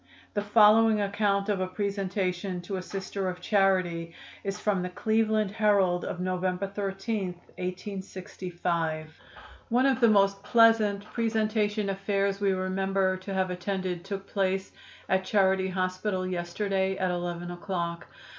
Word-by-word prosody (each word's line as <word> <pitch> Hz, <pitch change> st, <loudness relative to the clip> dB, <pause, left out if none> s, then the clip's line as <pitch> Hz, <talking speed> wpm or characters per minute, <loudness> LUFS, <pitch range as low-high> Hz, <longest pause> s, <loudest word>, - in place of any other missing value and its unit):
The 205 Hz, -, 0 dB
following 215 Hz, +1 st, +5 dB
account 200 Hz, 0 st, +1 dB
of 205 Hz, -3 st, 0 dB
a 185 Hz, -, 0 dB
presentation 195 Hz, -1 st, -2 dB
to 190 Hz, +2 st, -4 dB
a -, -, -3 dB
Sister 195 Hz, 0 st, -4 dB
of 180 Hz, 0 st, -6 dB
Charity 180 Hz, -4 st, +1 dB, 0.3 s
is 200 Hz, +1 st, -3 dB
from 205 Hz, -3 st, +1 dB
the 180 Hz, -, -3 dB
Cleveland 220 Hz, +1 st, +1 dB
Herald 200 Hz, -5 st, +2 dB
of 180 Hz, -, -4 dB
November 185 Hz, +1 st, -1 dB
13, 195 Hz, +1 st, -3 dB, 0.3 s
1865: 180 Hz, -4 st, -4 dB, 0.6 s
"One 245 Hz, +3 st, +3 dB
of 270 Hz, -1 st, +3 dB
the 235 Hz, -, +7 dB
most 200 Hz, -2 st, +3 dB
pleasant 215 Hz, -2 st, +4 dB
presentation 215 Hz, -2 st, 0 dB
affairs 195 Hz, 0 st, -1 dB
we 200 Hz, -1 st, +3 dB
remember 190 Hz, 0 st, 0 dB
to 185 Hz, +2 st, -8 dB
have 190 Hz, -1 st, 0 dB
attended 180 Hz, -1 st, -3 dB
took 195 Hz, 0 st, -5 dB
place 190 Hz, -1 st, -1 dB, 0.4 s
at 190 Hz, 0 st, +2 dB
Charity 190 Hz, -1 st, +2 dB
Hospital 185 Hz, +1 st, -1 dB
yesterday, 190 Hz, +2 st, -1 dB
at 185 Hz, -1 st, 0 dB
11 175 Hz, 0 st, -3 dB
o'clock. 175 Hz, -2 st, -4 dB
195 Hz, 135 wpm, -28 LUFS, 185-205 Hz, 0.6 s, the